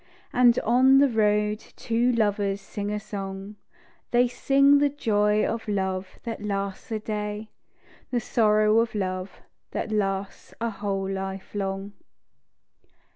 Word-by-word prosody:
And 245 -1 +5
on 255 +4 +5
the 280 +1 +6
road 210 -2 +2 0.2
two 235 +2 +1
lovers 205 -3 +1
sing 205 +1 -5
a 210 0 -2
song: 195 0 -7 0.5
They 245 +1 +4
sing 275 +3 +4
the 290 0 +3
joy 210 -6 +1
of 230 -1 -3
love 190 -2 -2
that 230 -3 -5
lasts 200 0 -3
a 220 - 0
day: 210 0 -4 0.6
The 245 - 0
sorrow 215 -1 +3
of 230 -1 0
love 185 -1 -3 0.3
that - - -3
lasts 195 -2 -2
a 230 0 -1
whole 195 -2 -3
life 190 0 -5
long. 195 0 -3
210 Hz, 130 wpm, -26 LUFS, 195-230 Hz, 0.6 s, the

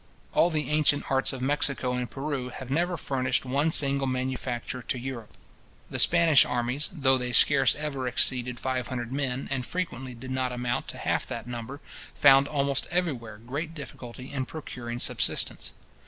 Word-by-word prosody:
All 170 - +4
the 155 -2 -1
ancient 150 -2 +2
arts 135 0 +2
of 130 -1 -5
Mexico 140 -2 +1
and 125 -1 -2
Peru 135 -2 -3
have 130 +1 -8
never 175 +4 +1
furnished 130 -2 0
one 140 +5 +1
single 140 -3 +2
manufacture 130 -1 -3
to 125 - -3
Europe. 125 -3 -7 0.5
The - - -1
Spanish 165 -4 +6
armies, 125 +4 -1
though 135 -6 +3
they 125 0 -2
scarce 135 +4 +5
ever 140 -4 -3
exceeded 125 -1 +1
five 130 -2 -2
hundred 120 -1 -4
men, 135 -2 -2
and 135 -2 0
frequently 130 -6 -4
did 130 +2 -8
not 130 -1 0
amount 125 -1 -2
to - - -4
half - - -1
that 115 -2 -5
number, 120 +3 -6 0.3
found 135 +1 +6
almost 140 -2 0
everywhere 135 -12 -2
great 145 +9 -5
difficulty 130 -3 -9
in 130 -2 -2
procuring 120 -6 -6
subsistence. - - -1
130 Hz, 165 wpm, -27 LUFS, 125-145 Hz, 0.5 s, Spanish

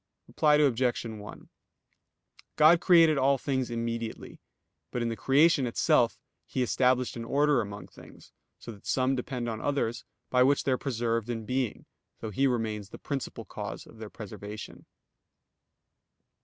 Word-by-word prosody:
Reply 150 -1 +3
Obj. 130 -5 +2
1: 110 -2 -9 1.1
God 165 +3 +6
created 165 -4 +5
all 135 +1 +3
things 130 -1 -2
immediately, 115 -1 -4 0.5
but 125 - -2
in 115 - -1
the 115 - -3
creation 140 +4 +3
itself 115 - +2 0.3
He 130 - -1
established 125 0 +1
an 115 - -5
order 145 +2 +2
among 100 -1 -7
things, - - -16 0.3
so - - -9
that 100 -3 -14
some 130 +1 +1
depend 125 -1 -4
on 110 -1 -4
others, 140 -5 -1 0.3
by 125 - +4
which 140 +2 +4
they 135 - 0
are 130 - +2
preserved 115 -3 -1
in 115 -2 -3
being, 125 -1 -2 0.3
though 110 - -5
He 135 +7 +2
remains 110 -5 -2
the - - -10
principal 140 -3 -5
cause - - -7
of 115 - -16
their 110 -1 -7
preservation. 105 0 -9
125 Hz, 150 wpm, -28 LUFS, 115-135 Hz, 1.1 s, God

